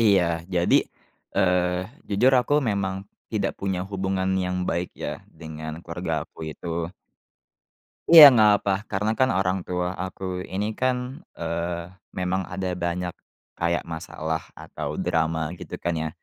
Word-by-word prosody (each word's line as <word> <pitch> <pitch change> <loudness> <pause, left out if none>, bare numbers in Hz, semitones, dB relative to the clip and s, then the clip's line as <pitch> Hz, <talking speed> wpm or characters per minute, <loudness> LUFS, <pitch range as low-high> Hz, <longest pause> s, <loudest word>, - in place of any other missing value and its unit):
Iya. 100 -5 +5 0.3
Jadi, 85 -1 +3 0.6
eee, 90 -1 +2 0.2
jujur 120 +6 +4
aku 125 +4 0
memang 100 -2 0 0.4
tidak 100 -3 0
punya 95 -2 -1
hubungan 95 -1 -1
yang 90 0 -2
baik, 85 +1 -1
ya, - - -5 0.2
dengan 80 -1 -6
keluarga 85 -2 -3
aku - - -26
itu. 85 +2 -4 1.2
Iya, 165 -2 +12
nggak 110 -3 +6
apa, 100 - +1 0.2
karena, 105 +2 0
kan, 130 - +4
orang 95 0 +1
tua 90 0 -1
aku 95 +1 -5 0.2
ini, 100 +3 -2
kan, 130 0 +2 0.4
eee, 85 +1 -3 0.2
memang 95 +1 -1
ada 95 0 -3
banyak 90 +1 -2 0.5
kayak 85 0 +1
masalah 80 0 -4
atau - - -6
drama, 80 -1 0
gitu, - - -8
kan, 85 - 0
ya, 80 0 -1
90 Hz, 135 wpm, -25 LUFS, 85-95 Hz, 1.2 s, Iya